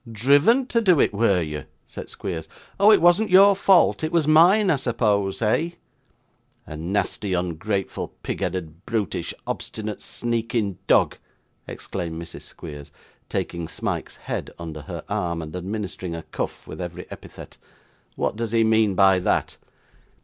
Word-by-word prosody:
'Driven 145 - +4
to 235 -2 +1
do 180 -8 +4
it, - - +3
were 100 -4 +2
you?' 75 -1 -5 0.2
said - - -9
Squeers. 85 -5 -5 0.3
'Oh! 200 +2 +7
it 210 - +6
wasn't 175 +5 +5
your 195 +2 +7
fault; 190 -4 +4
it 155 - -1
was 165 -4 +2
mine, 180 +6 +6
I 150 - +2
suppose 110 -5 0
eh?' 160 +11 +1 0.9
'A 75 - -8
nasty, 95 +4 -2
ungrateful, 90 +3 -2
pig - - -3
headed, 85 -1 -4
brutish, 110 -6 -2
obstinate, 110 -1 -5
sneaking 115 -4 -2
dog,' - - +3 0.5
exclaimed 85 -3 -5
Mrs. 85 0 -9
Squeers, 75 -3 -10 0.4
taking 85 -1 -3
Smike's - - -4
head - - -5
under 80 -2 -7
her 75 - -7
arm, 85 -1 -2
and 80 +1 -7
administering 95 -2 -4
a 85 - -6
cuff - - -5
at - - -7
every - - -6
epithet; - - -11 0.6
'what - - -1
does 115 0 -3
he 115 -1 +4
mean 110 -3 +3
by 95 -1 +5
that? 90 - 0
105 Hz, 150 wpm, -23 LUFS, 90-145 Hz, 0.9 s, Oh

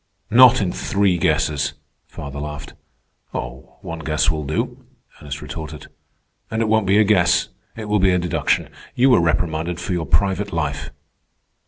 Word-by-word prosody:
"Not 125 0 +7
in 90 - -1
three 100 -2 +1
guesses," 75 -1 +1 0.3
father 70 0 -8
laughed. 75 -1 -7 0.6
"One 65 +6 -7
guess 80 0 +1
will 75 -1 -3
do," 75 +3 -3 0.4
Ernest 70 0 -6
retorted. 75 -2 -8 0.6
"And 110 - -2
it - - -1
won't 110 -2 +2
be 100 +2 +4
a 110 - +6
guess. 90 -5 +3 0.3
It 110 - -6
will 105 0 +1
be 95 0 +4
a 90 - +3
deduction. 90 -1 0 0.3
You 130 +2 +4
were 120 - +5
reprimanded 85 0 -1
for 90 +1 -3
your 85 -3 -2
private 95 +5 +1
life." 75 -4 -2
85 Hz, 155 wpm, -21 LUFS, 75-100 Hz, 0.6 s, Not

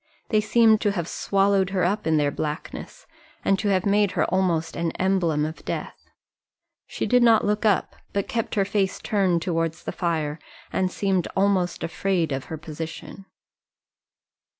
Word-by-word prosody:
They 215 -1 +3
seemed 220 0 +4
to 205 -2 +1
have 170 -4 -3
swallowed 195 -1 +1
her 195 -2 0
up 200 +2 0
in 160 -1 +3
their 145 -1 +2
blackness, 155 - -6 0.4
and 195 -1 +3
to 215 - -1
have 190 -2 +2
made 205 -1 +2
her - - +2
almost 175 -4 0
an 170 -1 -1
emblem 175 -6 +1
of 160 +1 -7
death. - - -6 0.8
She - - -3
did 250 0 +4
not 230 -2 +5
look 210 +2 0
up, 205 - +1 0.2
but 200 -1 -1
kept 230 -2 -2
her 200 -2 +2
face 195 -1 0
turned 190 -6 +1
towards 165 -2 -2
the - - -3
fire, 160 -3 -2 0.3
and 185 -1 +1
seemed 190 -3 0
almost 190 -2 +1
afraid 170 -1 0
of 135 -1 -3
her 160 - -6
position. 160 +5 -8
190 Hz, 165 wpm, -24 LUFS, 165-200 Hz, 0.8 s, not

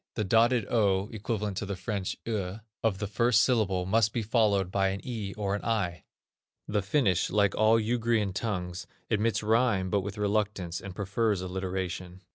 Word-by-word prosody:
The 105 - 0
dotted 115 +3 +3
ö 100 -3 +2
(equivalent 105 -2 -3
to 105 - -2
the 100 - -3
French 95 0 -3
eu) 100 -4 -2 0.2
of 110 -4 +1
the 105 - -3
first 115 +3 +3
syllable 105 -8 +1
must 110 +2 +2
be 115 - -1
followed 105 -4 +2
by 95 0 +2
an 95 +1 -2
e 110 -6 -4
or 100 -2 -2
an 105 - -3
i. 100 -7 -1 0.6
The 105 0 0
Finnish, 95 - +1
like 100 -1 +2
all 110 +1 +4
Ugrian 115 -3 0
tongues, 90 -4 -3 0.2
admits 110 +1 +1
rhyme, 110 -4 +2
but 100 - +2
with 100 +2 -6
reluctance, 100 -4 -1
and 95 -2 -8
prefers 100 0 0
alliteration. 95 -1 -4
105 Hz, 170 wpm, -29 LUFS, 95-110 Hz, 0.6 s, all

